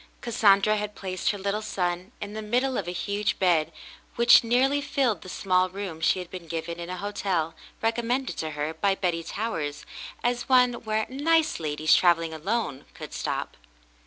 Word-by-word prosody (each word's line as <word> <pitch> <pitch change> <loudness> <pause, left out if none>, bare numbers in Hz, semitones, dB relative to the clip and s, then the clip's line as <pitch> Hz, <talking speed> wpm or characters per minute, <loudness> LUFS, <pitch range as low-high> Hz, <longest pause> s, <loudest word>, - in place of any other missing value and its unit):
Cassandra 215 -2 +4
had 210 0 -4
placed 185 -1 -2
her 205 - -1
little 200 +2 -2
son 180 -3 -2
in 205 0 -6
the 220 - -4
middle 250 +5 0
of 190 - -2
a - - -2
huge 200 +3 -1
bed 170 -5 +2 0.4
which 235 0 +7
nearly 260 +5 +2
filled 255 - 0
the 185 - -10
small 185 -1 +1
room 185 -4 -6
she 160 - +3
had 180 -1 -7
been 180 -3 -8
given 165 +1 -4
in 170 0 -6
a 185 - -4
hotel, 185 -4 -2 0.3
recommended 235 +3 0
to 160 - -2
her 150 +2 -2
by 195 +4 +1
Betty 175 -3 -1
Towers 165 -6 -4 0.4
as 245 +1 -1
one 250 -1 +5
where 220 -2 -2
'*nice 315 +4 +1
ladies 155 0 +1
travelling 165 -2 +3
alone" 160 - -2
could - - -9
stop. - - -3
200 Hz, 175 wpm, -26 LUFS, 170-230 Hz, 0.4 s, which